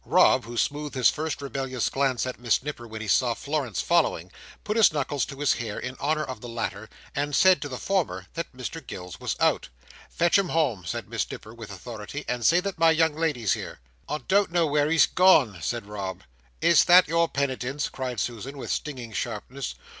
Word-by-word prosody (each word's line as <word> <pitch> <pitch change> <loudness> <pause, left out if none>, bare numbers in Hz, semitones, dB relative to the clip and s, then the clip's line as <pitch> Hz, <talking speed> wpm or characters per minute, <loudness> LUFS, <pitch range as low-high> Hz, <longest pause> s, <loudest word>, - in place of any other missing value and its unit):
Rob, - - +4
who 120 +1 -7
smoothed 145 +2 -1
his 125 -3 +4
first 155 -2 -4
rebellious 135 -3 -2
glance 135 -3 0
at 130 -2 -5
Miss 120 0 +1
Nipper 135 -5 -6
when 110 0 -7
he 110 - -5
saw 120 +2 +3
Florence 140 - -2
following, 150 - +1 0.3
put 210 - -2
his 225 -2 +6
knuckles 145 -2 -1
to 140 -1 -9
his 145 - +4
hair, 110 -3 -4
in 125 +1 -5
honour 155 +2 0
of 130 -6 -7
the 120 - -8
latter, 110 -2 -4 0.3
and 145 0 -1
said 185 -1 +5
to 145 - -4
the 130 - -5
former, 140 - -1
that 165 - -4
Mr 130 +6 -6
Gills 90 -2 -8
was - - -2
out." - - +2 0.4
"Fetch 175 +3 +3
him 190 -3 -1
home," 130 - 0
said - - -4
Miss - - -2
Nipper, 110 - -9
with 115 -2 -10
authority, 110 +7 -7
"and 120 -1 -2
say 170 +9 +5
that 195 -3 -5
my 165 0 +6
young 160 -1 +3
lady's 150 - 0
here." - - -6 0.3
"I 150 - -1
don't 200 -1 +3
know 170 -1 +3
where 145 0 +2
he's 165 0 +5
gone," 150 - +4
said 120 +5 -3
Rob. 95 -3 -6 0.4
"Is 170 -3 +5
that 180 +1 +7
your 165 0 +2
penitence?" 140 0 -2
cried 125 -3 -4
Susan, 125 +4 -4
with 135 - -5
stinging 125 -7 -4
sharpness. 120 +4 -4
135 Hz, 205 wpm, -26 LUFS, 115-155 Hz, 0.4 s, that